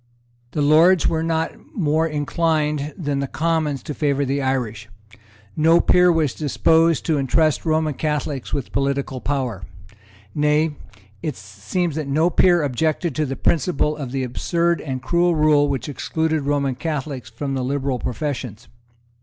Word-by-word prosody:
The 150 - 0
Lords 160 +4 +5
were 160 - 0
not 160 0 0 0.2
more 160 -3 +1
inclined 150 -1 -1
than 145 -5 -2
the 140 - -2
Commons 155 -3 -1
to 150 - -5
favour 140 -1 0
the 140 +1 -1
Irish. 120 -5 -2 0.7
No 165 +2 +4
peer 180 0 +4
was 155 -6 +1
disposed 160 +2 +2
to 155 -3 +1
entrust 150 +3 +1
Roman 155 -1 +1
Catholics 150 -2 -3
with 140 - -3
political 135 -1 -1
power. 130 -8 -2 0.7
Nay, 150 +1 +1 0.5
it 150 -4 -3
seems 105 - -3
that 155 -3 -3
no 155 +5 +2
peer 175 -1 +4
objected 155 +4 -1
to 155 +2 -1
the 135 - -3
principle 150 -1 +1
of 140 -5 -6
the 135 0 -2
absurd 170 +7 0
and 130 -3 -5
cruel 175 +4 +2
rule 150 -2 +3
which 135 -4 -2
excluded 160 +1 -2
Roman 140 -2 0
Catholics 140 -3 -4
from 135 +4 -4
the 130 -1 -2
liberal 135 -1 -1
professions. 125 -5 -4
150 Hz, 150 wpm, -21 LUFS, 135-160 Hz, 0.7 s, Lords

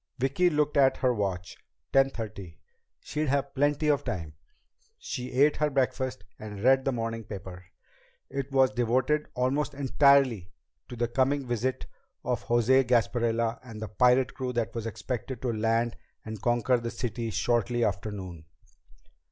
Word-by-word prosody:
Vicki 140 +8 +2
looked 150 -2 0
at 135 -1 +4
her 125 -1 +2
watch. 95 -5 -3 0.4
Ten 135 0 +5
thirty. 100 -9 -7 0.4
She'd 155 +1 -3
have 140 0 0
plenty 145 +2 +1
of 145 -1 +2
time. 80 -4 -4 0.6
She 125 0 -5
ate 140 +4 +3
her 150 0 +1
breakfast 130 -1 -1 0.2
and 105 -1 -8
read 135 +1 +5
the 135 - +2
morning 115 -2 -3
paper. 95 -3 -9 0.6
It 140 0 -5
was 135 -1 +4
devoted 130 +5 +1
almost 135 +3 0
entirely 135 -7 +3 0.4
to 120 - -7
the 120 0 0
coming 135 +3 +1
visit 120 +1 -2 0.4
of - - -1
the - - -19
José 120 +3 +4
Gasparilla 115 -1 +1
and 115 -4 -9
the 110 - -5
pirate 125 +3 +3
crew 130 -1 -3
that 120 -2 -1
was 115 -1 -4
expected 125 +3 -5
to 120 -2 0
land 115 +2 0 0.3
and 110 -2 -7
conquer 120 +1 +2
the 115 0 -4
city 115 0 -4
shortly 120 +1 +1
after 100 +2 -2
noon. 90 -6 -8
125 Hz, 155 wpm, -28 LUFS, 115-135 Hz, 0.6 s, Ten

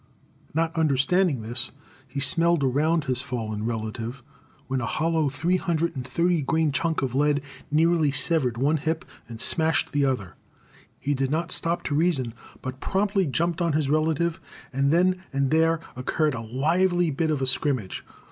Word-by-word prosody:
Not 165 +1 0
understanding 155 - +2
this, 120 +3 -1 0.4
he 135 +2 -5
smelled 165 +3 +4
around 150 +5 +2
his 130 -2 0
fallen 110 -5 -3
relative, 115 +2 -4 0.4
when 130 -1 -2
a 115 - -2
hollow 160 0 +1
three 165 +7 0
hundred 170 -2 -1
and 130 - -4
thirty 170 +6 +1
grain 160 +2 +1
chunk 165 +1 0
of 130 -2 -2
lead 145 +1 +2 0.3
nearly 160 0 +3
severed 140 -4 +1
one 145 +5 +2
hip 160 +3 -2 0.2
and 115 -1 -8
smashed 160 +4 +2
the 145 -1 +1
other. 125 -10 -2 0.7
He 145 - -1
did 135 -1 -1
not 165 +4 -1
stop 170 +1 0
to 145 - -2
reason, 145 -7 +1 0.3
but 130 0 -5
promptly 195 0 0
jumped 170 +5 0
on 170 -3 +1
his 145 -2 0
relative, 160 +2 +1 0.3
and 140 +2 +2
then 185 +2 +3
and 140 -1 0
there 165 +1 +3 0.2
occurred 150 +4 0
a 115 - -4
lively 165 +9 +1
bit 160 +3 -1
of 150 -3 0
a 135 - 0
scrimmage. 130 -6 +1
150 Hz, 165 wpm, -25 LUFS, 130-165 Hz, 0.7 s, smelled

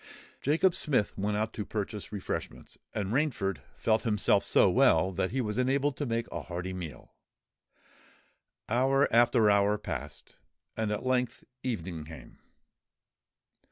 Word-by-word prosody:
Jacob 165 +6 +3
Smith 130 -12 0
went 105 +1 -1
out 110 +1 -1
to 105 - -3
purchase 105 0 -5
refreshments; 100 -3 -5 0.2
and 105 -1 -3
Rainford 120 - 0 0.2
felt 110 -1 +1
himself 105 -4 +2
so - - +4
well 90 +4 +4
that 95 +1 -1
he 130 +2 -1
was 105 0 -2
enabled 135 +2 +1
to 145 - -2
make 115 0 -1
a 85 - -4
hearty 90 +3 -5
meal. 85 -7 -8 1.5
Hour 135 +4 +3
after 115 -2 +5
hour 100 +1 +3
passed; 75 -7 -7 0.4
and 110 -1 -1
at 105 - -3
length 125 -1 0 0.2
evening 90 -10 -4
came. 80 +1 -12
105 Hz, 135 wpm, -29 LUFS, 95-125 Hz, 1.5 s, after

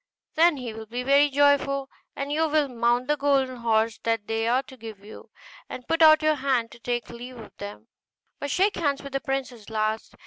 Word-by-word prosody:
Then 330 -1 +4
he 245 -4 -6
will 220 0 -9
be 245 +3 -4
very 280 +2 +4
joyful; 280 -1 +2 0.3
and 280 +1 -4
you 315 +1 +1
will 300 -1 +2
mount 240 0 0
the 295 - +2
golden 275 -3 +1
horse 225 -1 0
that 225 -2 -1
they 225 +1 -1
are 250 +3 +2
to 260 - -14
give 220 -4 -11
you, 215 - -12 0.4
and 250 - -8
put 330 0 0
out 310 -1 +7
your 310 0 +4
hand 260 -5 -1
to - - -14
take 240 -1 -3
leave 245 +2 -9
of 225 - -12
them; 205 0 -9 0.5
but 285 - -4
shake 390 +7 +1
hands 285 -3 -1
with 280 -1 -9
the 275 - -1
princess 265 -6 -4
last. 215 0 -2
255 Hz, 210 wpm, -25 LUFS, 230-285 Hz, 0.5 s, out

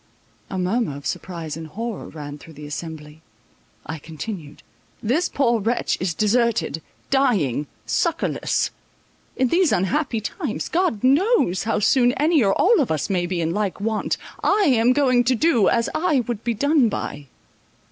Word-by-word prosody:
A 190 - -4
murmur 185 - 0
of 145 - -12
surprise 165 -5 -4
and 160 0 -7
horror 225 +5 -5
ran 145 -1 -8
through 165 +1 -13
the 150 - -9
assembly. 150 0 -7 0.6
I 160 -1 -5
continued:—"This 185 - -5
poor 240 -4 +2
wretch 230 +4 0
is 180 -3 -1
deserted, 215 - +1 0.3
dying, 195 - +2 0.2
succourless; - - 0 0.6
in 260 -1 +1
these 350 +2 +3
unhappy 240 - 0
times, 230 - -4
God 340 - 0
knows 270 - +3
how 225 - +1
soon 245 +4 +3
any 300 -1 +3
or 195 -1 +2
all 465 - +5
of 260 - -1
us 160 +4 -1
may 175 -2 0
be 175 -1 -2
in 165 0 -1
like 205 -1 -2
want. 215 +1 -1 0.3
I 410 +1 +3
am 240 -1 +4
going 255 -3 +3
to 255 +1 +3
do, 240 - +3
as 230 0 +1
I 310 -6 +2
would 235 -2 -5
be 235 -1 -1
done 285 0 +3
by." 145 -7 -5
220 Hz, 155 wpm, -22 LUFS, 165-260 Hz, 0.6 s, all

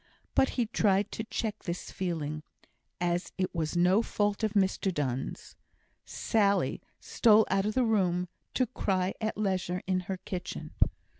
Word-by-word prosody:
But 265 - +4
he 240 - +3
tried 205 -2 +2
to 220 - -3
check 215 -1 -3
this 175 -1 -5
feeling, 155 -5 -3 0.6
as 175 0 0
it 185 -1 -1
was 165 0 -1
no 180 +5 +5
fault 205 -1 -1
of 215 -1 +1
Mr 195 -1 +2
Donne's. 135 -6 -3 0.5
Sally 200 -3 +1 0.2
stole 220 -2 +5
out 195 +1 +2
of 215 - -2
the 255 -1 +3
room, 180 -5 +2 0.3
to 255 - +3
cry 190 -4 0
at 220 -1 -1
leisure 185 -3 -1
in 185 -1 +1
her 190 - -1
kitchen. 180 0 -6
190 Hz, 150 wpm, -30 LUFS, 180-215 Hz, 0.6 s, no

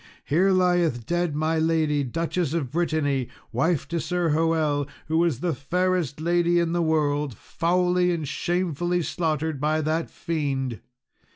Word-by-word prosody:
Here 175 +8 +3
lieth 175 - +2
dead 175 -3 0
my 160 +1 +1
lady, 160 -3 +1
Duchess 165 +3 -2
of 140 -7 -2
Brittany, 150 -6 0 0.2
wife 140 +4 0
to 170 0 -1
Sir 175 +1 0
Hoel, 155 -2 +1 0.2
who 160 +1 +1
was 165 -7 +1
the 175 -2 0
fairest 170 +1 -1
lady 175 +1 +2
in 170 -1 0
the 175 - +1
world, 150 -4 +1
foully 180 +1 +1
and 160 -4 -2
shamefully 175 +2 -1
slaughtered 160 -3 -2
by 155 +1 +1
that 155 +2 -1
fiend! 135 -7 -2
160 Hz, 145 wpm, -25 LUFS, 145-175 Hz, 0.2 s, Here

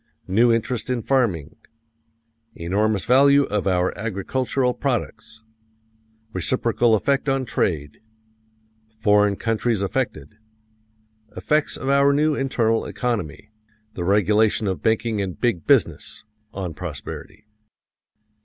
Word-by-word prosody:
New 115 +6 +3
interest 115 +2 -1
in 125 -3 -1
farming. 100 - 0 1.0
Enormous 100 +4 0
value 140 +3 +5
of 105 -6 -2
our 90 -1 +1
agricultural 125 +5 -1
products. 120 -4 -4 0.9
Reciprocal 115 +4 +1
effect 140 +5 0
on 135 -1 0
trade. 75 -10 -2 0.9
Foreign 105 -2 +2
countries 115 -1 -1
affected. 100 - -3 1.0
Effects 150 0 0
of 135 - -6
our 140 +1 +4
new 150 +2 +2
internal 115 -5 0
economy 105 - -4 0.4
the 90 - -4
regulation 105 +3 +2
of 95 -2 -2
banking 110 -1 0
and 95 -2 -5
"big 115 -9 -1
business" - - +1 0.3
on 90 -4 -5
prosperity. 90 +6 -8
110 Hz, 105 wpm, -22 LUFS, 95-125 Hz, 1.0 s, value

